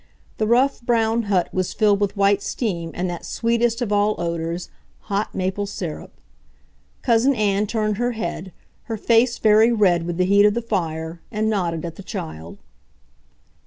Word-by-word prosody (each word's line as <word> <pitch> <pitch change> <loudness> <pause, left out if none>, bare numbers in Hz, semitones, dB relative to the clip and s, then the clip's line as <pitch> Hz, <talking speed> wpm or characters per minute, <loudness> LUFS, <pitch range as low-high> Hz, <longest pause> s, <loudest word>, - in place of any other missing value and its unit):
The 215 - +1
rough, 255 +4 +2
brown 230 -1 +1
hut 185 -4 +2
was 185 -1 -1
filled 205 -2 +3
with 205 0 -1
white 200 0 +3
steam 175 -10 -3
and 180 +1 -1
that 175 -1 -5
sweetest 235 +1 0
of 215 - -4
all 205 +1 +2
odors, 170 0 -3 0.3
hot 200 +1 -3
maple 190 +2 -2
syrup. 175 -5 -6 0.9
Cousin 245 +3 +3
Ann 210 -1 +1
turned 215 -2 -1
her 245 +1 0
head, 185 -4 -5 0.3
her 225 -2 -4
face 235 +3 +3
very 220 +2 +5
red 180 -7 +2
with 175 -1 -3
the 185 - +2
heat 200 +2 +5
of 210 - +1
the 235 - -1
fire, 165 -5 -3
and 215 0 0
nodded 175 -5 -1
at 165 -1 -7
the - - -8
child. 80 - -7
205 Hz, 165 wpm, -22 LUFS, 175-225 Hz, 0.9 s, very